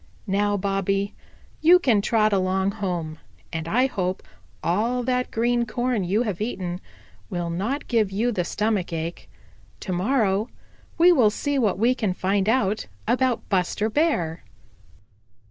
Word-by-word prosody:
"Now, 205 0 +1
Bobby, 195 0 -1 0.5
you 340 +3 +7
can 245 - +2
trot 215 0 +2
along 190 0 +1
home, 175 -7 -4 0.3
and 160 0 -3
I 245 +9 +3
hope 185 -7 -2 0.4
all 230 +8 0
that 250 0 0
green 240 +1 +1
corn 240 -2 -1
you 200 +6 +1
have 205 -5 -3
eaten 185 -5 -3 0.5
will 175 -3 -3
not 220 +12 -2
give 225 -5 +2
you 225 +5 0
the 185 -6 -1
stomach 210 -1 -1
ache. 165 +1 -5 0.5
To 185 - -3
morrow 210 +1 +1 0.5
we 345 +2 +7
will 250 -11 +5
see 285 +6 -1
what 210 -7 +1
we 235 +5 +3
can 210 -7 -1
find 195 +2 +1
out 215 -3 +1 0.2
about 250 0 +1
Buster 200 +3 0
Bear." 195 - 0
205 Hz, 145 wpm, -24 LUFS, 185-240 Hz, 0.5 s, you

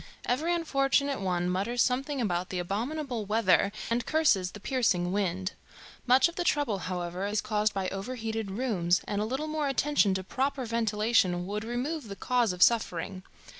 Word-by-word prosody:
Every 300 +8 0
unfortunate 280 -5 +1
one 180 -2 0
mutters 200 +7 +1
something 270 +2 -1
about 180 -6 -1
the 185 - -3
abominable 235 - -3
weather 200 -2 +3 0.2
and 235 +1 0
curses 295 - +2
the 205 - -11
piercing 200 -7 +1
wind. 190 -1 -1 0.6
Much 255 +4 +6
of 340 - -10
the 355 - 0
trouble, 285 - +1
however, 180 +1 -3
is 210 +1 0
caused 210 0 0
by 190 -1 -1
overheated 225 +1 -4
rooms, 190 -5 +1
and 205 0 -1
a - - 0
little 265 +7 -2
more 310 -1 -1
attention 275 -7 +2
to 190 - -2
proper 265 +5 -2
ventilation 215 -5 +1
would 210 +3 -3
remove 250 +5 -3
the 200 - -7
cause 245 -1 +1
of 180 -1 +3
suffering. 190 -5 +1
220 Hz, 170 wpm, -29 LUFS, 190-260 Hz, 0.6 s, Much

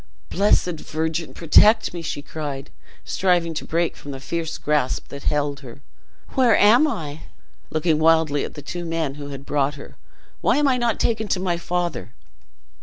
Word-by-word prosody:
"Blessed 180 -4 +2
Virgin, 160 +1 -3
protect 210 +7 +5
me!" 170 - -5
she 145 -3 -4
cried, 145 -3 -6 0.3
striving 175 -3 +1
to 155 - -4
break 170 +1 0
from 145 - -11
the 135 -1 -6
fierce 165 +3 -4
grasp 150 -4 -1
that 140 0 -9
held 145 -2 0
her. 130 -2 -11 0.5
"Where 250 -5 +4
am 235 +9 +6
I?" 155 - -5 0.4
looking 155 0 +1
wildly 160 -2 +3
at - - -7
the 145 - -9
two 175 +4 -5
men 165 -4 -2
who 145 - -6
had 140 -1 -8
brought 145 0 0
her: 140 - -12 0.4
"Why - - +3
am 295 -1 +3
I 260 -2 +3
not 240 -3 0
taken 220 -2 0
to 190 - 0
my 180 -2 0
father?" 175 -7 -3
160 Hz, 175 wpm, -22 LUFS, 145-180 Hz, 0.5 s, am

